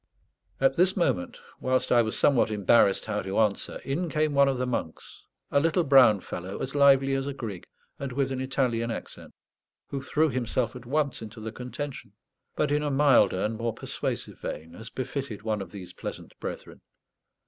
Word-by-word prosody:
At 135 0 +3
this 185 +3 +3
moment, 95 - 0 0.2
whilst 130 0 0
I 120 - +6
was 110 -1 -1
somewhat 130 -6 +4
embarrassed 105 -1 +3
how 105 -1 -2
to 95 +1 -4
answer, 105 -3 +1
in 165 +6 -1
came 155 -1 +1
one 140 0 +5
of 135 -1 +1
the 125 - -1
monks, 115 -10 -5 0.2
a 140 - +4
little 165 +4 +2
brown 130 -8 +6
fellow, 95 +3 -6
as 135 - -4
lively 135 -1 +5
as 135 0 -1
a 140 - -4
grig, 105 -9 -6 0.3
and 140 -2 -4
with 135 +1 0
an 130 -1 -2
Italian 125 -3 0
accent, 115 - -7 0.6
who 140 - -3
threw 155 +3 +1
himself 125 -1 -1
at 125 -1 -10
once 140 -2 0
into 110 +1 -9
the 110 0 -5
contention, 130 +4 -7 0.4
but 150 -1 0
in 150 +1 +2
a 150 - -1
milder 135 -10 +4
and 110 +1 -1
more 115 0 -2
persuasive - - -4
vein, 80 +2 -6
as 110 +5 -9
befitted 130 -4 -5
one 110 -2 -1
of 95 - -7
these 95 -2 -9
pleasant - - -7
brethren. - - -7
130 Hz, 185 wpm, -27 LUFS, 110-140 Hz, 0.6 s, I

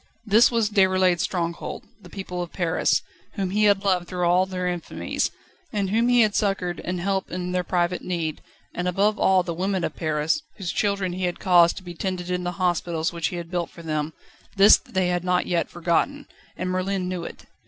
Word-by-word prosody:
This 220 +3 +6
was 230 -3 +1
Déroulède's 185 -3 +3
stronghold: 170 -2 -3 0.2
the 180 - -13
people 180 -1 -5
of 175 - -5
Paris, 175 -2 +1 0.3
whom 195 -3 -2
he 210 +2 +3
had 200 -1 +3
loved 185 -3 +1
through 180 -1 -1
all 180 +2 +3
their 185 -1 -3
infamies, 175 -2 -2 0.4
and 200 -3 -1
whom 230 +3 +2
he 245 -1 +5
had 215 -2 +3
succoured 190 -4 0
and 180 0 -3
helped 190 +1 -1
in 180 0 -4
their 180 0 0
private 175 0 0
need; 165 -4 -3 0.3
and 175 +1 -2
above 200 +4 +1
all 190 -1 +4
the 170 - -3
women 190 +1 -1
of - - -2
Paris, 155 - 0 0.2
whose 190 -5 -3
children 200 -3 0
he 185 0 -2
had 175 - -3
caused 175 -2 +5
to - - -8
be 175 -1 -8
tended 180 0 -3
in 180 0 -1
the 175 0 -2
hospitals 175 -3 -1
which 170 -2 -1
he - - -5
had 170 -1 -6
built 175 -2 -2
for 170 - -13
them 155 -1 -2 0.4
this 200 +2 +8
they 185 -2 -1
had 175 -1 0
not 180 0 +1
yet 170 -1 0
forgotten, 175 - 0 0.3
and 185 0 -2
Merlin 185 0 -1
knew 180 -2 -3
it. - - -9
180 Hz, 205 wpm, -24 LUFS, 175-195 Hz, 0.4 s, this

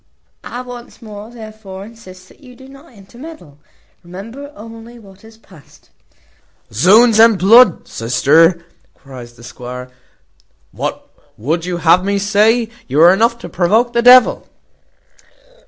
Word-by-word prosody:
I 245 - -8
once 245 -1 -12
more, 210 -1 -12
therefore, 215 -4 -12
insist, 185 -5 -16
that - - -22
you 250 -3 -17
do 265 +1 -16
not 275 +4 -17
intermeddle. 220 - -15 0.4
Remember 225 +11 -11
only 225 +2 -13
what 195 -3 -19
is 220 0 -17
past." 185 -9 -22 0.8
"Z 190 - +4
ds 225 -3 0
and 225 -2 +5
bl 210 +7 +6
d, 185 - -6
sister," 160 +9 +1 0.3
cries 125 -3 -13
the 120 - -18
squire, 125 +1 -10 0.8
"what - - -6 0.3
would 160 +9 -3
you 180 -1 -4
have 175 +2 +2
me 200 +1 -2
say? 215 +3 +1 0.2
You 135 +3 -2
are 175 +2 +6
enough 230 +4 0
to - - -7
provoke 215 +8 0
the 235 - +1
devil." 250 +1 +4
205 Hz, 140 wpm, -15 LUFS, 175-235 Hz, 0.8 s, bl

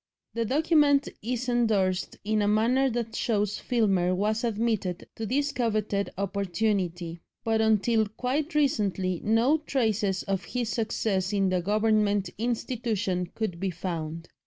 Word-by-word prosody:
The 230 0 -1
document 290 +1 +3
is 245 +3 -3
endorsed 210 -7 +1
in 215 +1 +1
a 205 - +2
manner 240 +6 +3
that 230 -2 -3
shows 210 -3 0
Filmer 195 -7 +1
was 215 +4 0
admitted 215 -5 -1
to 225 - -4
this 285 +5 0
coveted 215 -5 -1
opportunity; 185 -3 -1 0.2
but 225 -1 +1
until 220 0 +3
quite 275 +9 -2
recently 195 - +1
no 235 +8 +3
traces 215 -9 0
of 195 -1 -2
his 245 -3 -2
success 205 -2 -1
in 195 -2 +2
the 185 -1 +1
Government 210 0 +1
institution 220 -6 -1
could 200 -7 -3
be 195 +1 -1
found. 165 -2 -5
215 Hz, 135 wpm, -27 LUFS, 190-235 Hz, 0.2 s, document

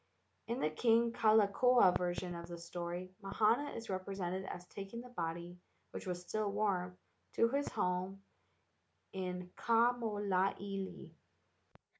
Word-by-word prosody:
In 235 +2 -2
the 155 - +1
King 230 +6 +3
Kalakaua 215 -1 +5
version 180 0 -1
of 170 0 -6
the 170 0 -6
story 175 +1 -5
Mahana 220 +8 +2
is 230 - -6
represented 190 -1 -3
as 180 -2 -6
taking 200 +5 -7
the 250 - -11
body, 175 -3 -4 0.3
which - - -7
was 180 -1 -2
still 210 +2 -1
warm, 185 -3 0 0.4
to 230 - +4
his 280 +3 0
home 185 +2 -1 0.9
in 180 -1 -4
Kamoiliili. 205 -4 +1
195 Hz, 120 wpm, -36 LUFS, 180-225 Hz, 0.9 s, Kalakaua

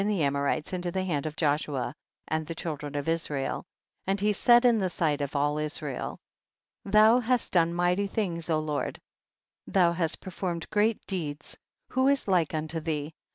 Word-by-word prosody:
261 205 0 +1
the 150 - +3
Amorites 140 +4 -1
into 175 -1 -2
the 190 +1 -1
hand 155 -5 -1
of 155 - -6
Joshua 145 -5 0 0.3
and 155 -1 -2
the 165 - -5
children 150 -3 -5
of 145 +1 -2
Israel, 155 -4 -1 0.4
and 195 +1 +1
he 210 +1 +2
said 240 +4 +5
in 235 -3 +5
the 190 -2 0
sight 155 -4 0
of 140 +1 -3
all 145 +1 +1
Israel, 150 -2 -3 0.7
2. - - -7
Thou 215 +4 +6
hast 245 0 0
done 170 -2 +3
mighty 175 +3 +1
things, 175 -6 -2
O 160 - +3
Lord, 155 -1 -2 0.7
thou 180 -3 +4
hast 170 -2 -1
performed 175 -2 -4
great 215 +1 +1
deeds; 150 -6 -4 0.3
who 260 +1 +2
is 280 -4 +2
like 175 -5 +2
unto 155 +1 -2
thee 155 -1 -3
165 Hz, 180 wpm, -28 LUFS, 150-195 Hz, 0.7 s, Thou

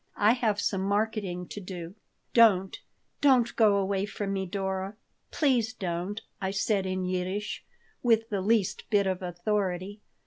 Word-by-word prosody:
"I 210 +2 +5
have 225 -4 +1
some 195 -1 0
marketing 200 -3 -1
to 205 - -6
do." 180 -2 -7 0.4
"Don't. 195 -5 +5 0.5
Don't 255 -4 +4
go 215 -3 +5
away 195 0 0
from 200 -1 -3
me, 190 -1 -2
Dora. 190 +1 -3 0.3
Please 250 -6 +1
don't," 180 +2 -3 0.2
I 190 - 0
said 195 0 0
in 185 0 -2
Yiddish, 185 +3 -3 0.4
with 225 -2 +3
the 200 -2 -1
least 210 -1 +1
bit 205 -2 +3
of 185 -1 -1
authority. 185 +2 -2
200 Hz, 145 wpm, -28 LUFS, 185-215 Hz, 0.5 s, I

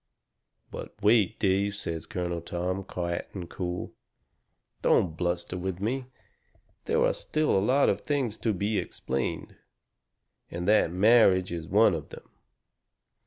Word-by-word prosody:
"But - - -8
wait, 110 0 +4
Dave," 100 +1 +1
says 85 -5 -3
Colonel 90 -4 -3
Tom, 90 +3 -3
quiet 85 -2 -4
and 90 -3 -5
cool. 90 0 -5 0.9
"Don't 80 -4 +2
bluster 90 +1 -2
with 95 0 -4
me. 125 +6 -2 0.8
There - - +2
are - - +2
still 155 0 0
a 95 - +3
lot 135 +6 +3
of 100 0 +1
things 135 -7 -1
to 115 - 0
be 100 +2 0
explained. 65 +1 -4 0.9
And 90 +1 -5
that 105 -5 +4
marriage 95 -2 +4
is 85 -2 -5
one 105 +1 +4
of 80 -4 -5
them. - - -12
95 Hz, 135 wpm, -28 LUFS, 85-110 Hz, 0.9 s, wait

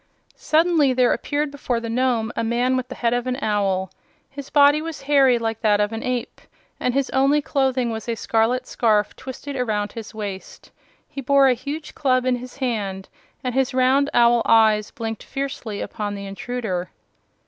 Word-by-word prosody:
Suddenly 315 -4 +2
there 250 -1 +3
appeared 290 0 -2
before 260 -4 -2
the 230 - -6
Nome 235 -1 0
a - - -1
man 240 +3 +1
with 255 -1 -2
the - - -8
head 235 -1 0
of 245 +1 -1
an 255 0 -1
owl. 195 -5 0 0.4
His 280 0 -8
body 290 +1 +5
was 320 -3 -7
hairy 275 -3 +4
like 225 -1 -3
that 210 -2 +3
of 210 +1 +1
an 225 - -4
ape, 250 0 -3 0.4
and 250 - -1
his 275 -1 0
only 275 +3 +3
clothing 265 -4 0
was 220 +1 -5
a 230 - 0
scarlet 230 +3 0
scarf 215 -5 +1
twisted 270 +2 -8
around 215 -5 -1
his 225 -3 -8
waist. 205 -3 -8 0.4
He 275 - -7
bore 275 +1 +4
a - - +4
huge 290 +5 -6
club 255 -3 +1
in 255 -1 +2
his 250 +2 -10
hand 205 -7 -3 0.3
and 250 -1 -2
his 265 0 0
round 265 +2 +3
owl 235 0 +4
eyes 215 -2 +4
blinked 225 -2 -5
fiercely 270 -6 -5
upon 205 -2 -4
the 200 0 -7
intruder. 195 -3 -4
245 Hz, 180 wpm, -22 LUFS, 220-270 Hz, 0.4 s, body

